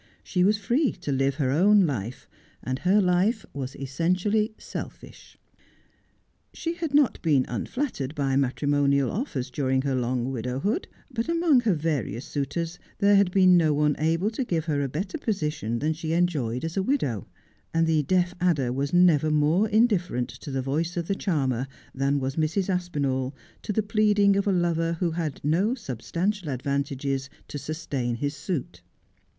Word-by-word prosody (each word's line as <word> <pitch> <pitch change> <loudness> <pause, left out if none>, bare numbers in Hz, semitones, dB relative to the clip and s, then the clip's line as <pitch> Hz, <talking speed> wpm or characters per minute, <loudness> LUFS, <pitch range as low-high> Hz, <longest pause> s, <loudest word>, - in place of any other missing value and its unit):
She 180 -2 0
was 205 +3 +4
free 240 +8 +1
to 145 - -5
live 135 0 +1
her 135 -3 0
own 195 +6 +5
life, 125 - -4 0.4
and 130 +1 -2
her 190 +3 +3
life 195 +4 +2
was 135 -1 -5
essentially 185 +10 0
selfish. - - -9 1.2
She 330 0 -2
had 330 -4 -3
not 290 -4 +3
been 145 -6 +3
unflattered 145 - -3
by 135 -3 0
matrimonial 140 0 +2
offers 145 - -3
during 130 -1 0
her 140 -1 0
long 125 0 -1
widowhood; 130 - -2 0.2
but 235 +3 -3
among 335 -5 +4
her 225 -7 +2
various 145 -6 -2
suitors 165 +4 -3 0.2
there 200 0 +4
had 200 -2 +4
been 185 -1 +5
no 155 -3 +3
one 150 0 +2
able 165 +7 +1
to 245 +4 -2
give 165 -9 -1
her 145 -3 0
a 140 - -1
better 185 - -4
position 150 - -2
than 155 +6 0
she 160 0 -3
enjoyed 150 -8 0
as 165 - -4
a 195 - +1
widow: 165 - -1 0.4
and 165 0 +2
the 160 -1 +2
deaf 180 +3 +1
adder 145 -9 +2
was 140 +2 -2
never 170 -4 +4
more 155 +8 +2
indifferent 200 - +2
to 125 +3 -9
the 135 -1 -2
voice 160 +6 -1
of 170 -1 -2
the - - +1
charmer 135 - -1 0.3
than 140 +1 +1
was 135 +2 -3
Mrs. 160 +5 0
Aspinall 140 -7 -1 0.3
to - - -4
the 215 +1 +1
pleading 210 -2 +3
of 200 +1 0
a - - +4
lover 170 -2 +1
who 170 0 -1
had 160 -4 -3
no 185 - +2
substantial 175 - -3
advantages 140 0 -2 0.2
to 145 - -6
sustain 140 -6 -3
his 145 +5 -3
suit. 155 -1 -4
160 Hz, 165 wpm, -26 LUFS, 135-195 Hz, 1.2 s, own